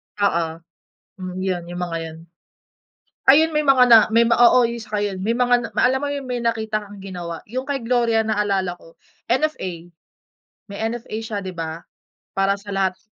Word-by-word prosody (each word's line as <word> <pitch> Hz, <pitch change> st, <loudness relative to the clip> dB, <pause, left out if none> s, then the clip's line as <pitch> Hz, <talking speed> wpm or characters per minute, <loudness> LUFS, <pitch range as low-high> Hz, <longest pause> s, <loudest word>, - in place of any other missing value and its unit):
Oo, 170 Hz, -5 st, +1 dB, 0.7 s
hmm, 185 Hz, 0 st, -6 dB
yun 185 Hz, -2 st, -2 dB
yung 175 Hz, 0 st, -5 dB
mga 170 Hz, -2 st, -2 dB
yun. 160 Hz, -1 st, -7 dB, 1.1 s
Ayun, 310 Hz, +4 st, +6 dB
may 300 Hz, -1 st, 0 dB
mga 270 Hz, -2 st, +6 dB
na 230 Hz, -, +10 dB, 0.2 s
may 230 Hz, -, +6 dB
oo, 240 Hz, +1 st, +6 dB
yung 235 Hz, -, -5 dB
saka 210 Hz, -1 st, -3 dB
yun. 200 Hz, -2 st, -2 dB
May 215 Hz, +5 st, -1 dB
mga 245 Hz, 0 st, +2 dB
na -, -, -9 dB
ma -, -, +1 dB
alam 260 Hz, +1 st, +3 dB
mo 290 Hz, -, -3 dB
yun, 280 Hz, -, -4 dB
may 245 Hz, -, -1 dB
nakita 220 Hz, -2 st, -1 dB
kang 205 Hz, -1 st, -11 dB
ginawa. 175 Hz, -4 st, -6 dB
Yung 255 Hz, +3 st, -4 dB
kay 280 Hz, -3 st, -2 dB
Gloria 230 Hz, -1 st, +2 dB
naalala 200 Hz, -4 st, -1 dB
ko 165 Hz, -, -18 dB, 0.3 s
NFA. 190 Hz, -, -2 dB, 0.8 s
May 200 Hz, -1 st, -8 dB
NFA 235 Hz, -2 st, -6 dB
siya, 215 Hz, -2 st, -4 dB
'di 190 Hz, -2 st, -7 dB
ba? 165 Hz, -1 st, -5 dB, 0.6 s
Para 195 Hz, +1 st, +1 dB
sa 205 Hz, 0 st, -10 dB
lahat 190 Hz, -1 st, 0 dB
205 Hz, 185 wpm, -21 LUFS, 185-240 Hz, 1.1 s, na